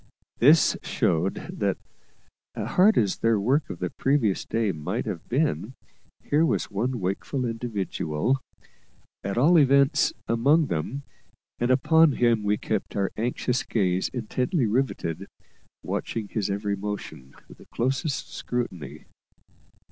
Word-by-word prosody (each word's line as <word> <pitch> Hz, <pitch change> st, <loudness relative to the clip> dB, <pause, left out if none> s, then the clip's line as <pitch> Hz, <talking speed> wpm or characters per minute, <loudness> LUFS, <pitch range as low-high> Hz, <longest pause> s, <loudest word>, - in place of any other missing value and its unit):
This 150 Hz, +6 st, +6 dB
showed 85 Hz, +4 st, 0 dB, 0.2 s
that, -, -, 0 dB, 0.8 s
hard 205 Hz, +4 st, +3 dB
as 100 Hz, -4 st, +2 dB
their 115 Hz, -2 st, +2 dB
work 135 Hz, +9 st, +1 dB
of -, -, -5 dB
the -, -, -3 dB
previous 135 Hz, -8 st, +1 dB
day 115 Hz, -2 st, 0 dB
might 75 Hz, -3 st, -3 dB
have 85 Hz, -, -6 dB
been, 130 Hz, -, 0 dB, 0.5 s
here 150 Hz, +3 st, +2 dB
was 165 Hz, -, 0 dB
one 120 Hz, +5 st, -1 dB
wakeful 100 Hz, +8 st, -2 dB
individual, 115 Hz, -, -2 dB, 0.8 s
at 100 Hz, +2 st, -3 dB
all 160 Hz, +7 st, +6 dB
events, 140 Hz, -, +4 dB, 0.2 s
among 140 Hz, +8 st, +3 dB
them; 115 Hz, -, -3 dB, 0.6 s
and 120 Hz, -, 0 dB
upon 150 Hz, +4 st, +5 dB
him 120 Hz, -3 st, +2 dB
we 105 Hz, 0 st, +1 dB
kept -, -, -3 dB
our 100 Hz, -1 st, 0 dB
anxious 120 Hz, +2 st, -1 dB
gaze 95 Hz, -4 st, 0 dB
intently 125 Hz, -, -1 dB
riveted, 105 Hz, -, -1 dB, 0.6 s
watching 110 Hz, -3 st, -3 dB
his 105 Hz, -3 st, -2 dB
every 100 Hz, 0 st, -1 dB
motion 100 Hz, -10 st, -7 dB
with -, -, -15 dB
the -, -, -16 dB
closest 135 Hz, +4 st, -2 dB
scrutiny. 85 Hz, -, -5 dB
115 Hz, 125 wpm, -25 LUFS, 100-135 Hz, 0.8 s, This